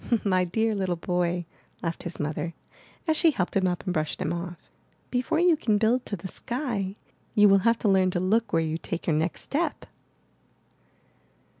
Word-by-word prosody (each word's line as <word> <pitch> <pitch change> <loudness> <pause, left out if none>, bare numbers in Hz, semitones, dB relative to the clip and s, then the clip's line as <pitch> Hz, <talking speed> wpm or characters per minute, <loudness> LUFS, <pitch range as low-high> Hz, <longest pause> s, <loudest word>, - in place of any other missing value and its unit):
My 185 -2 +2
dear 220 +5 +1
little 190 -3 0
boy," 175 0 -1 0.4
laughed 165 -1 -2
his 175 - -6
mother 150 +2 -3 0.5
as 315 - +3
she 330 +1 +5
helped 185 - -1
him 190 -1 +3
up 180 -1 -2
and 180 - -1
brushed 155 -2 -1
him - - -1
off, 175 0 -7 0.4
'^before 250 +5 +1
you 350 -1 +5
can 220 -8 +1
build 230 +4 +2
to 205 - -2
the 190 0 -7
sky, 235 -4 -3 0.4
you 210 0 +7
will 195 0 +6
have 230 +3 +3
to 220 - -1
learn 190 -2 +4
to 180 - -1
look 210 +5 +1
where 165 0 +2
you 160 +1 -2
take 170 - -5
your 160 - +2
next 160 +3 -1
step!" 315 +5 -2
190 Hz, 185 wpm, -27 LUFS, 175-225 Hz, 0.5 s, you